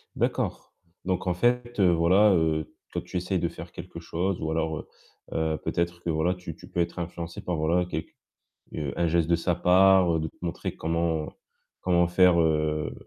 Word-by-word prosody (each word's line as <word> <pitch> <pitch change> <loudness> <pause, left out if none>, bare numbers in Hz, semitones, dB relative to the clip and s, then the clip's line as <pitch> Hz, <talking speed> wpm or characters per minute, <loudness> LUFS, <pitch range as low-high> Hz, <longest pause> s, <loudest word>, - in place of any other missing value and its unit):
D'accord, - - -2 0.3
donc 95 0 -1
en 90 - +1
fait, 120 +4 0
heu, 90 -3 +5
voilà, 90 +5 +5
heu, 80 -1 0 0.2
toi - - -3
tu 90 - -5
essayes 90 +1 -1
de 85 - 0
faire 85 -1 -10
quelque 85 -1 -9
chose 85 +3 -2
ou 80 - -2
alors, 80 -1 -1
heu - - -10 0.5
heu, 80 -1 0
peut-être 85 0 -2
que, 85 - -3
voilà, 80 +4 +1
tu 90 -3 -8
tu - - -14
peux - - -4
être 85 +1 -3
influencée 85 0 -5
par, 90 - -2
voilà, 85 +3 +1
quelque 80 -2 -5 0.6
heu, 75 -5 -3
un 85 - +1
geste 85 0 +1
de 85 - +4
sa 85 +1 0
part, 90 -1 +5
de 80 - -2
te - - -12
montrer 85 - -3
comment 80 -1 -1 0.5
comment 85 -1 +3
faire, 90 -1 +5
heu, 75 -1 +1
85 Hz, 195 wpm, -27 LUFS, 80-90 Hz, 0.6 s, heu